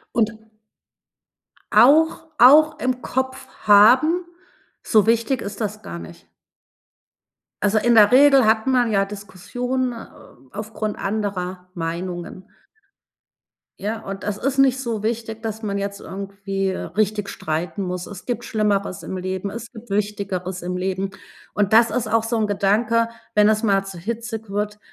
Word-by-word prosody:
Und 230 Hz, -1 st, +1 dB, 1.4 s
auch 300 Hz, +9 st, +5 dB
auch 300 Hz, +5 st, +6 dB
im 255 Hz, -2 st, -1 dB
Kopf 260 Hz, +1 st, -3 dB, 0.2 s
haben, 255 Hz, -, +6 dB, 0.6 s
so 215 Hz, -3 st, +3 dB
wichtig 230 Hz, +3 st, +1 dB
ist 200 Hz, +2 st, -7 dB
das 215 Hz, 0 st, -4 dB
gar 85 Hz, -, -7 dB
nicht. 85 Hz, +1 st, -12 dB, 1.4 s
Also, 210 Hz, +1 st, +2 dB
in 235 Hz, +2 st, +3 dB
der 210 Hz, -1 st, +7 dB
Regel 270 Hz, -2 st, +6 dB
hat 220 Hz, +1 st, +2 dB
man 250 Hz, -3 st, +2 dB
ja 195 Hz, -2 st, +2 dB
Diskussionen, 210 Hz, +6 st, -4 dB
äh, 230 Hz, -, -9 dB, 0.5 s
aufgrund 215 Hz, 0 st, -5 dB
anderer 190 Hz, -3 st, -3 dB
Meinungen. 175 Hz, +2 st, -5 dB, 1.3 s
Ja, 215 Hz, +3 st, -3 dB
und 195 Hz, 0 st, -7 dB
das 210 Hz, -1 st, -2 dB
ist 275 Hz, +1 st, -2 dB
nicht 265 Hz, -1 st, +4 dB
so 230 Hz, -5 st, -3 dB
wichtig, 225 Hz, 0 st, -3 dB
dass 220 Hz, 0 st, -5 dB
man 200 Hz, -2 st, -2 dB
jetzt 200 Hz, 0 st, -4 dB
irgendwie, 195 Hz, 0 st, -5 dB
äh, 190 Hz, -, -2 dB
richtig 210 Hz, 0 st, -1 dB
streiten 160 Hz, +5 st, -3 dB
muss. 180 Hz, -1 st, -4 dB
Es 205 Hz, -3 st, -10 dB
gibt 240 Hz, -1 st, -3 dB
Schlimmeres 200 Hz, -4 st, -1 dB
im 190 Hz, -, -6 dB
Leben, 185 Hz, +1 st, -4 dB
es 235 Hz, +3 st, -8 dB
gibt 230 Hz, +1 st, -12 dB
Wichtigeres 195 Hz, -3 st, -3 dB
im 180 Hz, +1 st, -3 dB
Leben. 190 Hz, +1 st, -2 dB, 0.4 s
Und, 205 Hz, 0 st, 0 dB
das 230 Hz, +1 st, +6 dB
ist 245 Hz, -2 st, -1 dB
auch 225 Hz, +1 st, +1 dB
so 230 Hz, 0 st, -1 dB
'n 215 Hz, -1 st, +1 dB
Gedanke, 220 Hz, +3 st, +1 dB, 0.3 s
wenn 210 Hz, 0 st, +5 dB
das 215 Hz, +1 st, +2 dB
mal 195 Hz, -2 st, +2 dB
zu 195 Hz, -2 st, -8 dB
hitzig 225 Hz, +2 st, -5 dB
wird, 210 Hz, +1 st, -3 dB
210 Hz, 150 wpm, -21 LUFS, 195-235 Hz, 1.4 s, der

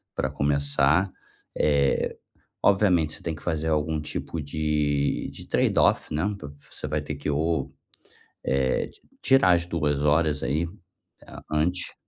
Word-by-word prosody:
pra 65 Hz, -, 0 dB
começar, 70 Hz, +5 st, +2 dB, 0.5 s
eh, 70 Hz, -2 st, +2 dB, 0.5 s
obviamente, 95 Hz, -6 st, +3 dB
você -, -, -9 dB
tem 80 Hz, -2 st, -2 dB
que 75 Hz, -, -13 dB
fazer 80 Hz, -2 st, -1 dB
algum 80 Hz, 0 st, 0 dB
tipo 80 Hz, +1 st, -4 dB
de 75 Hz, -1 st, 0 dB
de -, -, -11 dB
trade-off, -, -, +2 dB
né, 75 Hz, +2 st, 0 dB, 0.5 s
você 75 Hz, -, -5 dB
vai 75 Hz, +1 st, -1 dB
ter 75 Hz, 0 st, -5 dB
que 70 Hz, +2 st, -4 dB
ou, 75 Hz, 0 st, 0 dB, 0.8 s
eh, 65 Hz, -1 st, +1 dB, 0.3 s
tirar 130 Hz, -9 st, +5 dB
as 85 Hz, 0 st, +2 dB
2 75 Hz, -4 st, -1 dB
horas 75 Hz, 0 st, +2 dB
aí, 70 Hz, +7 st, 0 dB, 0.6 s
eh, -, -, -12 dB
antes 90 Hz, +4 st, 0 dB
75 Hz, 135 wpm, -26 LUFS, 70-85 Hz, 0.8 s, tirar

